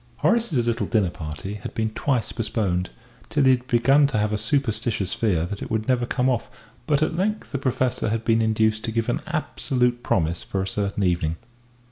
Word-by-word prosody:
Horace's 220 - +2
little 115 -1 0
dinner 105 -6 +2
party 80 +5 -6
had - - -7
been 110 -1 0
twice 125 +1 -1
postponed, 100 -5 -1 0.4
till 145 -2 +2
he 130 - +6
had 125 0 0
begun 135 +5 +4
to 135 - -2
have 105 0 +1
a - - +1
superstitious 115 -8 -1
fear 90 -8 +1
that 100 +3 -6
it - - -5
would 110 -1 -1
never 125 -2 +2
come 125 0 +1
off; 125 -3 0 0.4
but 150 -1 +3
at 155 - -1
length 210 +4 -1
the 140 - -2
Professor 130 -3 0
had 115 +1 -2
been 115 -1 +3
induced 110 0 +2
to 115 - -2
give 115 0 -1
an - - 0
absolute 125 -2 0
promise 85 -6 0
for 95 -1 -2
a - - -4
certain 100 +1 -1
evening. 85 -3 +1
115 Hz, 200 wpm, -24 LUFS, 100-130 Hz, 0.4 s, he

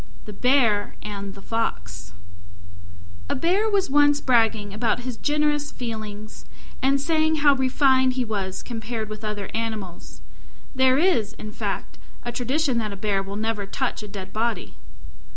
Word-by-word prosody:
THE 210 - -8
BEAR 235 -4 +2
AND 200 -1 -6
THE 195 - -12
FOX 95 - -3 1.2
A - - 0
Bear 375 +9 +2
was 400 -2 +2
once 290 +1 +4
bragging 225 -6 +2
about 225 +3 0
his 250 -1 -4
generous 295 +2 0
feelings, 215 -3 -6 0.4
and 275 +1 +3
saying 315 +2 +2
how 285 - +8
refined 260 -1 +3
he 250 -1 -1
was 195 -4 -3
compared 225 -2 -4
with 215 0 -7
other 210 -2 -4
animals. 220 -6 -5 0.5
(There 260 -1 +4
is, 275 - +2
in 215 -1 -8
fact, - - -4 0.2
a 240 - -3
tradition 255 +2 0
that 215 -2 -2
a - - -6
Bear 195 -1 0
will 195 +1 -6
never 215 -1 -2
touch 260 +4 -2
a 210 - -7
dead 195 -2 -8
body.) 230 +2 -1
230 Hz, 150 wpm, -24 LUFS, 210-270 Hz, 1.2 s, how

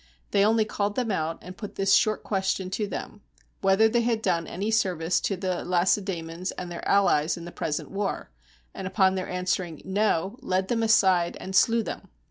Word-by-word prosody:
They 200 - +4
only 220 +1 +3
called 205 -1 -2
them 245 -4 -1
out, 165 -3 -1
and 180 +1 -9
put 200 +3 -8
this 195 0 +2
short 215 -1 +3
question 190 -2 -1
to 210 +2 -1
them 205 +1 -7 0.2
— - - -39
"Whether 195 +3 +4
they 235 +2 +2
had 230 -2 0
done 170 -3 0
any 200 +5 -3
service 180 -6 +1
to 195 - -1
the 185 -1 -2
Lacedaemons 180 -1 0
and 180 -1 -6
their 170 - -6
allies 175 -5 +3
in 170 - -8
the 175 - -8
present 150 -3 -3
war?" 195 - -3 0.4
and 185 - -5
upon 190 0 +3
their 185 -1 -3
an 180 0 -3
swering, 175 -4 -2
"No," 200 +2 0
led 190 +1 -1
them 230 -2 +1
aside, 190 -6 +3
and 190 0 -6
slew 230 +3 +4
them. - - -6
190 Hz, 200 wpm, -26 LUFS, 180-210 Hz, 0.4 s, They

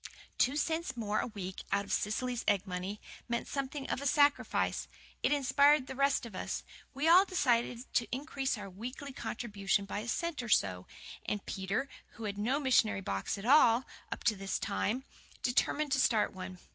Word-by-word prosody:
Two 255 +3 +3
cents 320 -2 -1
more 215 -2 0
a - - -1
week 190 -5 -6
out 200 +1 +1
of - - -3
Cecily's 245 +3 -1
egg 205 -2 +3
money, 190 +2 -4 0.3
meant 235 0 -1
something 275 0 -3
of - - -2
a 280 - 0
sacrifice. 285 0 +2 0.3
It - - +2
inspired 285 0 +4
the 265 - -6
rest 275 -1 +2
of 230 - -9
us. - - -4 0.3
We 285 +4 0
all 355 +3 +8
decided 245 -10 +1
to 235 - +2
increase 270 -1 -2
our 205 -1 -7
weekly 250 +9 -7
contribution 200 -6 -1
by 200 - -4
a 220 - -6
cent 335 +3 -1
or 240 - -6
so. 90 - +2 0.4
And 205 -1 -2
Peter, 195 +8 -2 0.3
who 230 - -9
had 200 -2 -3
had 205 - -2
no 260 +6 +1
missionary 240 -7 +3
box 100 - -2
at 200 - -7
all, 255 -2 +6 0.3
up - - -5
to 215 - +3
this 195 0 -2
time, 225 +5 -1 0.4
determined 285 +4 +1
to 270 - +3
start 225 -4 +3
one. 185 -1 -7
240 Hz, 185 wpm, -32 LUFS, 200-275 Hz, 0.4 s, all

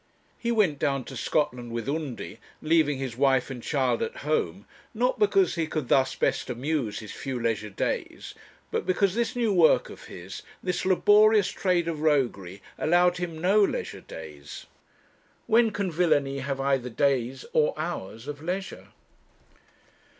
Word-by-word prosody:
He 235 - -1
went 195 -11 +2
down 135 -2 0
to 135 - -9
Scotland 125 -2 -1
with 115 +1 -4
Undy, 140 -7 -4 0.2
leaving 155 -3 +2
his 130 -3 -4
wife 135 0 +2
and 125 -2 -6
child 130 -3 0
at - - -3
home, 155 +6 -1 0.3
not 250 +3 +1
because 395 -3 +3
he 165 -2 -1
could 155 -5 -3
thus 130 -1 +3
best - - 0
amuse 125 -2 -2
his 105 -2 -8
few 135 -3 -5
leisure 110 -2 -1
days, 100 - -3 0.4
but - - -2
because 185 0 +2
this 235 +3 -1
new 230 -4 +1
work 170 -4 +4
of - - -12
his, 90 +2 -9 0.2
this 180 0 -1
laborious 210 +2 +5
trade 180 -3 0
of 160 -3 -3
roguery, 120 - 0 0.2
allowed 175 +2 +3
him 175 -3 -4
no 195 +5 +4
leisure - - -2
days. 75 -3 -10 0.8
When 230 0 +4
can 200 -4 -2
villany 150 -5 +1
have 135 0 -3
either 135 -2 0
days 130 0 0
or 150 -1 +2
hours 135 - -5
of 145 0 -6
leisure? 185 +4 -5
150 Hz, 155 wpm, -26 LUFS, 125-180 Hz, 0.8 s, laborious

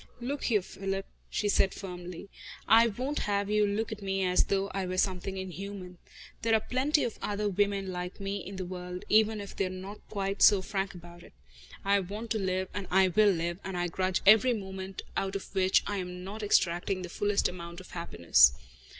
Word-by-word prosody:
"Look 270 +4 -3
here, 210 -6 +2
Philip," 195 +1 -4 0.2
she 210 - -1
said 195 -1 +2
firmly, 180 -1 -8 0.4
"I 230 +1 +7
won't 255 +7 -3
have 200 0 0
you 210 -1 +3
look 215 +3 -2
at 215 -1 -6
me 195 -1 -1
as 180 0 +3
though 195 0 0
I 190 -1 -2
were 185 0 -3
something 190 0 0
inhuman. 190 -1 -7 0.4
There 225 0 +3
are - - +4
plenty 270 +7 +1
of 235 - -3
other 210 0 -1
women 200 -1 0
like 180 +1 -5
me 195 0 -3
in 195 +1 -7
the 185 -1 -4
world, 180 0 -6
even 220 0 +4
if 200 -1 -8
they 195 - 0
are - - -5
not 190 +3 -8
quite 195 -1 -3
so 195 -2 +7
frank 195 -1 -3
about 175 0 -12
it. - - -16 0.5
I 200 0 +4
want 205 +5 -6
to 220 - +1
live, 185 -1 -1
and 200 -2 -4
I 190 0 +4
will 210 +3 +5
live, 170 -1 -1
and 190 -1 -4
I 175 0 0
grudge 185 +2 -1
every 220 +5 +7
moment 190 -2 -6
out 195 0 -1
of 195 - -6
which 190 -1 +3
I 205 - -2
am 180 -1 -5
not 205 +4 -6
extracting 185 -2 +1
the - - -4
fullest 205 +3 +1
amount 170 -1 -7
of 185 - -13
happiness. 85 - +4
195 Hz, 205 wpm, -30 LUFS, 180-205 Hz, 0.5 s, I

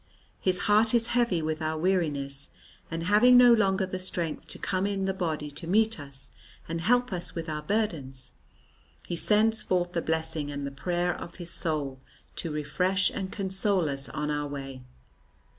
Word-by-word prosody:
His 185 -1 0
heart 215 +2 +4
is 230 -1 +2
heavy 235 -9 +2
with 155 0 -2
our 155 0 -1
weariness, 150 -6 -1 0.4
and, 165 0 -3
having 215 +7 +6
no 245 -1 +8
longer 195 -4 +2
the 185 0 -5
strength 175 -3 -3
to - - -3
come 190 +1 -1
in 195 -1 -1
the 190 - 0
body 160 -5 -3
to 165 +3 -7
meet 220 +2 +2
us 140 -1 -9 0.4
and 165 0 -3
help 245 +4 +2
us 175 -1 -4
with 165 0 -4
our 155 -1 -3
burdens, 150 -9 -2 0.7
he 175 - -3
sends 220 +5 +3
forth 175 -1 0
the 170 - 0
blessing 160 -2 -1
and 140 -1 -4
the 140 - -4
prayer 175 +5 -1
of 170 - -9
his 175 -2 -5
soul 145 -5 -1 0.4
to 165 - -2
refresh 180 +6 +1
and 190 -1 -4
console 190 -2 +1
us 135 -1 +1
on 150 0 -2
our 145 0 -1
way." 135 -2 -7
175 Hz, 175 wpm, -28 LUFS, 150-195 Hz, 0.7 s, no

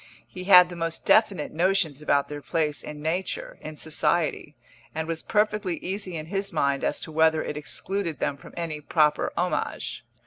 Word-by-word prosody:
He 185 0 -8
had 180 -2 +8
the 175 - -7
most 165 -1 -3
definite 200 -8 +3
notions 170 -4 +1
about 145 -2 +2
their 145 0 -7
place 150 -1 -1
in 150 0 -8
nature, 175 +4 -2
in 155 0 -7
society, 155 0 0 0.4
and 160 0 -2
was 165 -1 -2
perfectly 210 -4 0
easy 190 -2 -4
in 155 - -5
his 195 +3 -3
mind 140 -3 0
as - - 0
to 160 - -6
whether 160 0 +3
it - - -4
excluded 170 +3 -3
them 140 - -1
from - - -14
any 160 -3 -3
proper 150 0 +2
homage. - - -2
160 Hz, 175 wpm, -26 LUFS, 150-185 Hz, 0.4 s, had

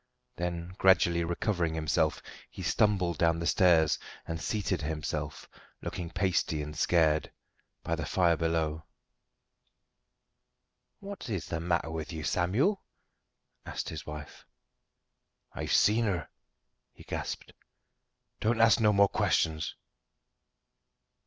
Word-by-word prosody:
Then, 85 0 -4
gradually 85 -2 +4
recovering 85 -1 -1
himself, 80 0 0 0.3
he - - -8
stumbled 95 -6 +1
down 85 -1 +3
the 85 - -3
stairs, 85 -4 +4 0.3
and 80 0 -4
seated 100 -5 -1
himself, 75 0 -4 0.4
looking 85 -2 -4
pasty 85 -4 0
and 75 +1 -7
scared, 80 -2 +2 0.5
by - - -2
the - - -2
fire 85 -2 +3
below. 80 -1 -1 2.2
"What 200 -8 -7
is 100 -7 -2
the 80 - -3
matter 85 -1 0
with 80 0 -5
you, 80 -2 -5
Samuel?" 115 - +1 0.8
asked - - -5
his - - -7
wife. 75 -1 -8 1.1
"I've - - -4
seen 110 +2 +4
her," 90 -7 -2 0.6
he - - -15
gasped. - - -5 0.9
"Don't 115 +2 +1
ask 115 -2 +6
no 105 -2 +5
more 100 0 +5
questions." 80 -4 0
85 Hz, 115 wpm, -30 LUFS, 80-95 Hz, 2.2 s, ask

